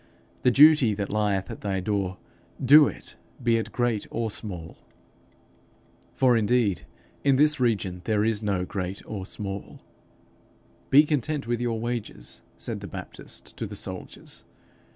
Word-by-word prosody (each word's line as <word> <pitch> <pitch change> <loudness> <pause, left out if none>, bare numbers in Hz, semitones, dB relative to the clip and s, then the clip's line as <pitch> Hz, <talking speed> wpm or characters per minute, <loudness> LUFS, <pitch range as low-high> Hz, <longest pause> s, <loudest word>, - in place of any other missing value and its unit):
The 125 - +4
duty 140 -4 +6
that 100 0 -3
lieth 100 -3 0
at - - -8
thy 95 -2 -1
door, 95 -1 -1 0.4
do 145 +3 +8
it, - - -8 0.3
be 115 -1 +3
it 115 - -3
great 120 -4 0
or 115 -1 -2
small.' 90 -7 -6 1.4
For 125 -2 +4
indeed 110 -3 +1 0.4
in 140 -1 +4
this 150 +2 +4
region 100 -7 0
there 105 -1 +2
is 110 -2 +1
no 100 -4 0
great 95 0 -4
or 95 -3 -5
small. 100 -2 -6 1.1
'Be 145 +3 +8
content 150 -1 -1
with 120 0 -1
your 115 -2 -1
wages,' 120 - -4 0.2
said - - -5
the - - -7
Baptist - - -8
to - - -3
the - - -8
soldiers. - - -6
110 Hz, 145 wpm, -26 LUFS, 100-125 Hz, 1.4 s, do